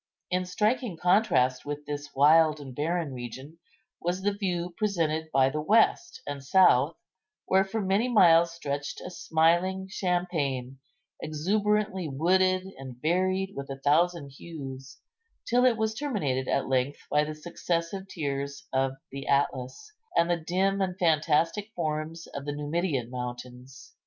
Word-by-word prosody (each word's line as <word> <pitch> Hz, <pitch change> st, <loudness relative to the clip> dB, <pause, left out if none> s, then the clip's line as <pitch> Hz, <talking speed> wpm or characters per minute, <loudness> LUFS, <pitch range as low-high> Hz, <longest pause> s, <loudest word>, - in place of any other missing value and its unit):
In 180 Hz, 0 st, 0 dB
striking 210 Hz, +1 st, 0 dB
contrast 180 Hz, -, +2 dB
with 145 Hz, 0 st, -5 dB
this 145 Hz, 0 st, -5 dB
wild 155 Hz, +2 st, +5 dB
and 135 Hz, -3 st, -9 dB
barren 160 Hz, 0 st, -1 dB
region 130 Hz, +6 st, -8 dB, 0.4 s
was 180 Hz, +2 st, -2 dB
the 205 Hz, 0 st, +1 dB
view 180 Hz, -3 st, -2 dB
presented 160 Hz, -6 st, -1 dB
by 135 Hz, 0 st, +3 dB
the 150 Hz, -, -2 dB
west 230 Hz, -, +2 dB
and 140 Hz, -1 st, -5 dB
south, 155 Hz, -2 st, +4 dB, 0.5 s
where 190 Hz, +1 st, +4 dB
for 195 Hz, +3 st, -4 dB
many 200 Hz, +5 st, +1 dB
miles 170 Hz, -7 st, +6 dB
stretched 145 Hz, -3 st, -4 dB
a 180 Hz, -, -8 dB
smiling 175 Hz, +3 st, +1 dB
champaign, 160 Hz, -9 st, -2 dB, 0.4 s
exuberantly 195 Hz, +3 st, 0 dB
wooded, 185 Hz, +6 st, +2 dB, 0.2 s
and 130 Hz, -2 st, -9 dB
varied 185 Hz, +5 st, 0 dB
with 140 Hz, 0 st, -7 dB
a 135 Hz, -, -5 dB
thousand 155 Hz, +2 st, +2 dB
hues, 135 Hz, -2 st, -9 dB, 0.5 s
till 245 Hz, +2 st, +3 dB
it 245 Hz, -3 st, +4 dB
was 220 Hz, 0 st, 0 dB
terminated 160 Hz, -, -2 dB
at -, -, 0 dB
length 130 Hz, +1 st, 0 dB
by 150 Hz, 0 st, +4 dB
the 155 Hz, 0 st, -5 dB
successive 170 Hz, +3 st, -3 dB
tiers 140 Hz, -5 st, -4 dB
of 135 Hz, 0 st, +1 dB, 0.2 s
the 135 Hz, 0 st, -7 dB
Atlas, 140 Hz, -, -1 dB, 0.3 s
and 170 Hz, +1 st, +3 dB
the -, -, +3 dB
dim 190 Hz, +4 st, 0 dB
and 185 Hz, -1 st, -1 dB
fantastic 165 Hz, +4 st, +1 dB
forms 160 Hz, 0 st, -3 dB
of 140 Hz, 0 st, -6 dB
the 145 Hz, -, -3 dB
Numidian 145 Hz, -4 st, -2 dB
mountains. 125 Hz, +1 st, -8 dB
165 Hz, 140 wpm, -28 LUFS, 140-185 Hz, 0.5 s, miles